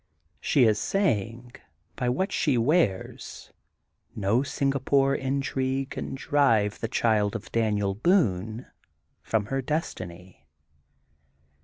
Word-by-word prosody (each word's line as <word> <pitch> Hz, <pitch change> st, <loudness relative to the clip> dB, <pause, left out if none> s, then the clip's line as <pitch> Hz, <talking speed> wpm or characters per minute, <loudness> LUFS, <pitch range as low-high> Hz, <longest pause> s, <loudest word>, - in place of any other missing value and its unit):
She 135 Hz, -, +3 dB
is 110 Hz, -3 st, +3 dB
saying, 120 Hz, -, -1 dB, 0.4 s
by 125 Hz, -, -1 dB
what 190 Hz, +11 st, -1 dB
she 140 Hz, -5 st, +1 dB
wears: 120 Hz, -, -1 dB, 0.6 s
No 105 Hz, +3 st, +1 dB
Singa 140 Hz, 0 st, -1 dB
pore 135 Hz, 0 st, +3 dB
intrigue 135 Hz, 0 st, -1 dB
can -, -, -5 dB
drive 115 Hz, -8 st, +2 dB
the 115 Hz, -, -2 dB
child 110 Hz, -2 st, +1 dB
of 110 Hz, -, -7 dB
Daniel 105 Hz, -3 st, +1 dB
Boone 110 Hz, -, +1 dB, 0.6 s
from 110 Hz, -2 st, -1 dB
her 135 Hz, -, +1 dB
destiny. 90 Hz, -, -5 dB
120 Hz, 110 wpm, -26 LUFS, 105-140 Hz, 0.6 s, She